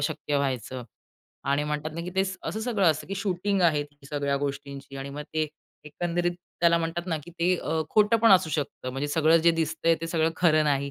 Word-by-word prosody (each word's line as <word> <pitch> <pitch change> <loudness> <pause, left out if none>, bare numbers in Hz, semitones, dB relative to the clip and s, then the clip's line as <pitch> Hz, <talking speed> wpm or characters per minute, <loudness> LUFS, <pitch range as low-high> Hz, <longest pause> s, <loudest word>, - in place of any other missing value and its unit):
शक्य 145 0 -1
व्हायचं 130 -2 -2 0.7
आणि 145 +1 +2
म्हणतात 150 +1 -3
ना, 170 - -4
की 175 +2 -5
ते 190 0 +3
स 190 0 -4
असं 220 - -3
सगळं 220 -4 0
असतं, 155 - -4
की 195 - -4
शूटिंग 195 0 -1
आहे, 155 -4 +3
ती 145 -1 -16
सगळ्या 140 -1 -1
गोष्टींची 140 0 -5
आणि 135 +1 -6
मग 145 +1 -6
ते 155 -1 +1 0.4
एकंदरीत 175 +3 -1 0.3
त्याला 170 0 +5
म्हणतात 165 +2 -3
ना, 165 - 0
की 175 - -11
ते 175 +2 +1
अ, 160 -1 -2
खोटं 210 +1 +4
पण 230 +1 +5
असू 185 -3 +4
शकतं. 140 -4 -3
म्हणजे 135 +3 -3
सगळं 160 +2 +4
जे - - +9
दिसतंय 165 +1 +1
ते 165 - -3
सगळं 165 -1 +1
खरं 155 -3 +4
नाही. 140 -1 +1
160 Hz, 215 wpm, -27 LUFS, 145-175 Hz, 0.7 s, जे